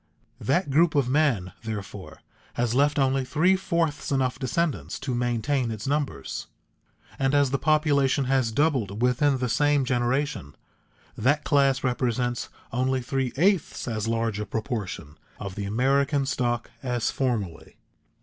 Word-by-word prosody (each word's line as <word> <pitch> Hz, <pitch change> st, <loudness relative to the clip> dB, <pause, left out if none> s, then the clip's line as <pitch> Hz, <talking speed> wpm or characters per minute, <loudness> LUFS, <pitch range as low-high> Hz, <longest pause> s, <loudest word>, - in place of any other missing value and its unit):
That 140 Hz, +3 st, 0 dB
group 165 Hz, +3 st, +4 dB
of 140 Hz, -4 st, +3 dB
men, 130 Hz, -12 st, +2 dB
therefore, 105 Hz, -3 st, -7 dB, 0.3 s
has 120 Hz, -1 st, 0 dB
left 145 Hz, +3 st, +3 dB
only 135 Hz, -1 st, +2 dB
three 160 Hz, +8 st, +3 dB
fourths 170 Hz, -6 st, -1 dB
enough 130 Hz, -2 st, 0 dB
descendants 155 Hz, +4 st, -1 dB
to 130 Hz, -1 st, -2 dB
maintain 120 Hz, +2 st, 0 dB
its 110 Hz, -1 st, -5 dB
numbers, 140 Hz, -, -2 dB, 0.7 s
and 135 Hz, +1 st, +2 dB
as 140 Hz, -2 st, +3 dB
the 140 Hz, -, 0 dB
population 145 Hz, -2 st, +2 dB
has 130 Hz, -3 st, +1 dB
doubled 120 Hz, -6 st, 0 dB
within 130 Hz, +3 st, +3 dB
the 125 Hz, -1 st, -1 dB
same 145 Hz, +3 st, +2 dB
generation, 120 Hz, -, -1 dB, 0.6 s
that 145 Hz, +6 st, +1 dB
class 140 Hz, -2 st, +2 dB
represents 125 Hz, -1 st, -1 dB, 0.2 s
only 130 Hz, +1 st, +1 dB
three 130 Hz, 0 st, -1 dB
eighths 185 Hz, -2 st, +1 dB
as 110 Hz, -2 st, -2 dB
large 115 Hz, -2 st, -1 dB
a 105 Hz, -, -2 dB
proportion 105 Hz, -, -4 dB, 0.2 s
of 100 Hz, -2 st, -5 dB
the 100 Hz, +1 st, -4 dB
American 135 Hz, +6 st, +1 dB
stock 120 Hz, -3 st, -1 dB
as 120 Hz, -3 st, -1 dB
formerly. 110 Hz, -11 st, -3 dB
130 Hz, 140 wpm, -26 LUFS, 115-145 Hz, 0.7 s, group